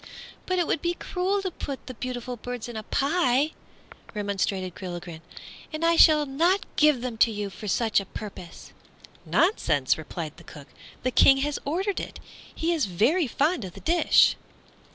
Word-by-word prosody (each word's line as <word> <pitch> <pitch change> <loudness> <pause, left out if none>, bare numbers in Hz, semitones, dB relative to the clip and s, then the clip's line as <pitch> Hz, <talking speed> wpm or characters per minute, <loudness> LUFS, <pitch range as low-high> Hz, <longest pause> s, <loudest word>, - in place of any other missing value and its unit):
"But 370 - 0
it 350 - +2
would 295 - -1
be 345 0 -1
cruel 385 +3 -1
to 375 - -2
put 275 -4 -6
the 255 - -7
beautiful 250 0 -5
birds 245 0 -6
in 240 - -8
a 220 - -3
pie," 280 - +1 0.6
remonstrated 195 -3 -2
Gilligren, 175 -3 -7 0.5
"and 310 +1 -2
I 335 0 +4
shall 305 -2 +6
not 335 +8 +1
give 300 -5 +4
them 240 -3 -5
to 230 - +6
you 205 -2 -4
for 210 - -9
such 220 +2 +2
a 195 - -6
purpose." 195 -6 -9 0.5
"Nonsense!" 155 - +2
replied 160 0 -6
the 170 - -14
cook, 145 -3 -12 0.3
"the 255 - 0
King 270 +2 +6
has 295 -1 -2
ordered 375 +7 -1
it; - - -7 0.4
he 335 +2 0
is 310 -9 0
very 250 - +2
fond 295 - 0
of 185 -2 -7
the - - -11
dish." 340 +1 +4
255 Hz, 175 wpm, -26 LUFS, 200-330 Hz, 0.6 s, shall